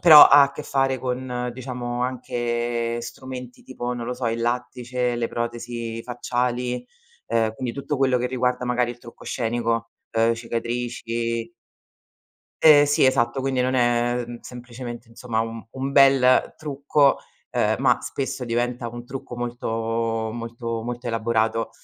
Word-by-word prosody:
però 155 -4 +11
ha 140 0 +8
a 140 - -5
che 150 - -6
fare 135 -2 +1
con, 125 -1 -3
diciamo, 125 -1 -4
anche 120 -1 -2
strumenti 125 +1 -8
tipo, 125 -1 -4
non 120 -1 -5
lo 125 - -2
so, 125 -1 -3
il 115 +1 -2
lattice, 125 +1 -1
le 120 -1 -1
protesi 120 -1 -4
facciali, 125 0 -2 0.4
uhm, 115 -1 +1
quindi 120 +1 -4
tutto 140 +1 -3
quello 130 -2 +3
che 125 0 0
riguarda 125 0 0
magari 125 0 +1
il 120 - -17
trucco 120 -1 -13
scenico, 115 -1 -1 0.2
uhm, 115 +1 +3
cicatrici 115 0 -3 1.1
Ehm, 150 -2 +8
sì, 145 -1 +3
esatto, 130 -1 +2
quindi 130 -1 0
non 130 +1 +1
è 120 0 +2 0.2
semplicemente, 120 -1 -8
insomma, 115 -1 -3
un 115 0 -5
un 135 +1 -3
bel 135 -2 +5
trucco, 145 -1 +2 0.3
uhm, - - +2
ma - - +3
spesso 135 -2 -3
diventa 120 0 -1
un 120 +1 -8
trucco 125 -1 -7
molto 115 -1 -2
molto 115 0 -4
molto 120 +2 -5
elaborato. 115 -1 0
120 Hz, 145 wpm, -24 LUFS, 115-125 Hz, 1.1 s, però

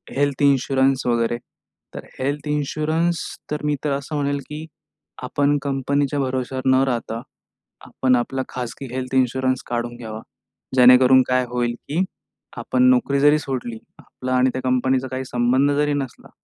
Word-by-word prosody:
health 140 0 0
insurance 135 -1 +2
वगैरे 120 0 +1 0.6
तर - - -7
health 145 +3 -2
insurance 155 +3 0 0.3
तर 150 0 -3
मी 150 0 +1
तर 150 - 0
असं 140 +2 -3
म्हणेल 140 -1 0
की 150 +1 -6 0.6
आपण 145 0 +1
कंपनीच्या 140 +1 0
भरवशावर 130 0 -2
न 130 0 +5
राहता, 115 -2 -2 0.6
आपण 130 -1 +1
आपला 130 +2 -1
खाजगी 125 +2 -6
हेल्थ 130 0 -3
इन्शुरन्स 130 0 +1
काढून 120 0 -3
घ्यावा, 110 -2 -7 0.6
जेणेकरून 125 +1 +7
काय 125 0 +2
होईल 120 -1 -1
की 165 +6 +1 0.5
आपण 255 - 0
नोकरी 240 - +2
जरी 145 +2 +5
सोडली, 125 -5 -4 0.2
आपला 130 0 -6
आणि 130 +1 +4
त्या 130 - -3
कंपनीचा 130 +1 +1
काही 130 0 -3
संबंध 125 +3 +2
जरी 150 0 +2
नसला, 135 -3 -5
130 Hz, 145 wpm, -22 LUFS, 125-145 Hz, 0.6 s, जेणेकरून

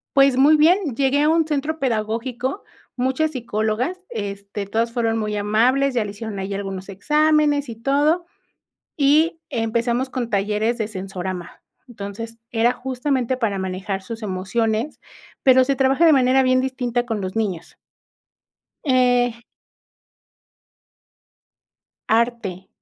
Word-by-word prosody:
Pues, 275 -2 +5
muy 300 +3 +6
bien, 325 - +3
llegué 275 +2 +2
a 300 - +3
un 325 -1 +3
centro 300 +1 -1
pedagógico, 240 - -2 0.3
muchas 265 +5 0
psicólogas, 240 - -2
este, 200 -1 -5
todas 230 +3 -1
fueron 225 -2 0
muy 210 -1 -2
amables, 250 +7 +2
ya 235 -3 +1
le 205 - -5
hicieron 205 -1 -6
ahí 195 +1 -4
algunos 195 -1 -5
exámenes 300 +5 +2
y 230 - -6
todo. 290 +8 +1 0.7
Y 310 +3 +3
empezamos 235 +3 -1
con 245 -3 -3
talleres 210 +3 0
de 220 -2 -2
sensorama. 185 -3 -6 0.3
Entonces, 225 +1 -7
era 235 +1 +3
justamente 260 -1 -1
para 205 -6 -1
manejar 190 +1 -3
sus 225 +2 -8
emociones, 220 +6 -1 0.4
pero 260 -1 +6
se 275 +2 0
trabaja 270 +5 +3
de 320 - +7
manera 265 0 +4
bien 255 0 +3
distinta 245 -2 -1
con 220 -4 -3
los 185 +1 -5
niños. 195 -7 -3 1.1
Eh. 245 -3 +2 2.7
Arte, 225 -5 0
235 Hz, 125 wpm, -21 LUFS, 210-270 Hz, 2.7 s, de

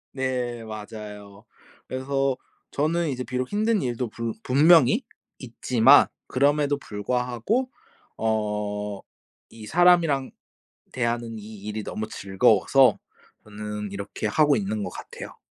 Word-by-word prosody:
네, 125 -3 -2
맞아요. 105 -1 -9 0.4
그래서 135 0 -1 0.3
저는 160 +2 0
이제 125 -1 -3
비록 125 0 -3
힘든 215 0 +1
일도 120 -2 -2
불 115 -1 -4
분명히 155 - +5 0.4
있지만, 125 +1 +4 0.2
그럼에도 145 +1 +2
불구하고 125 - -2 0.5
어 105 -2 -2 0.5
이 110 -1 -10
사람이랑 170 -6 +3 0.6
대하는 115 -2 -2
이 105 0 -10
일이 105 0 -4
너무 110 0 -5
즐거워서 95 -3 +3 0.5
저는 105 -1 -6
이렇게 100 +2 -6
하고 150 +4 +3
있는 105 0 -2
거 95 - -4
같아요. - - -10
120 Hz, 245 characters per minute, -25 LUFS, 105-140 Hz, 0.6 s, 분명히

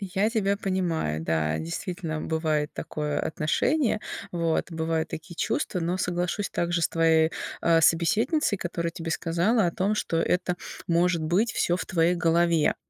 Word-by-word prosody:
Я 195 +2 0
тебя 200 -3 +1
понимаю, 175 - -1
да, 80 -1 0
действительно, 160 - -4
бывает 155 -2 -1
такое 150 -1 -3
отношение, 225 - 0 0.3
вот, 170 0 0
бывают 160 -1 -1
такие 170 +2 -8
чувства, 180 +1 -1
но 175 +2 -1
соглашусь 180 +2 -1
также 170 0 0
с - - +3
твоей, 160 -1 +3 0.3
э, 165 -1 +4
собеседницей, 205 - +2
которая 170 -1 -2
тебе 165 0 -6
сказала 175 +6 +1
о - - +1
том, 200 +3 0
что 170 -5 -1
это 180 +1 +1 0.3
может 170 -1 +2
быть 190 +9 +1
всё 175 - +1
в - - -4
твоей 170 0 +2
голове. 170 -1 +2
170 Hz, 150 wpm, -26 LUFS, 160-185 Hz, 0.3 s, э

